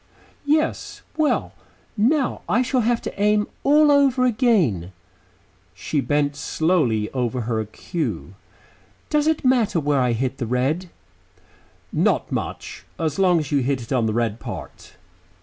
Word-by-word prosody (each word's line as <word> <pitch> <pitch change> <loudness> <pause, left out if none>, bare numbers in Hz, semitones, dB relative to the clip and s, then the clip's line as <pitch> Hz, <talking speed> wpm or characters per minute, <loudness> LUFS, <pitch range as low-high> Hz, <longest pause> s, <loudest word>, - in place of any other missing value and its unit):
"Yes. 310 +2 0
Well, 310 -2 0 0.4
now 255 +5 +1
I 245 +4 +3
shall 255 0 +1
have 235 +1 0
to 200 - -6
aim 210 0 +3 0.2
all 295 +1 +5
over 275 -3 +4
again." 190 - +1 0.8
She 150 - -2
bent 145 0 0
slowly 140 -10 0
over 125 -1 -2
her 110 -1 -1
cue. 105 - -5 0.8
"Does 300 0 +2
it 315 -3 0
matter 235 -8 +3
where 145 -2 +1
I 125 -1 +2
hit 130 +3 -2
the 120 - -2
red?" 135 +9 -1 1.0
"Not - - +1
much. - - -5
As 155 -1 -2
long 180 -2 +4
as 150 -3 -3
you 145 - +3
hit 130 -1 -1
it 115 - -5
on 120 -3 +2
the 110 - -1
red 115 -1 -1
part." - - -9
155 Hz, 145 wpm, -22 LUFS, -, 1.0 s, all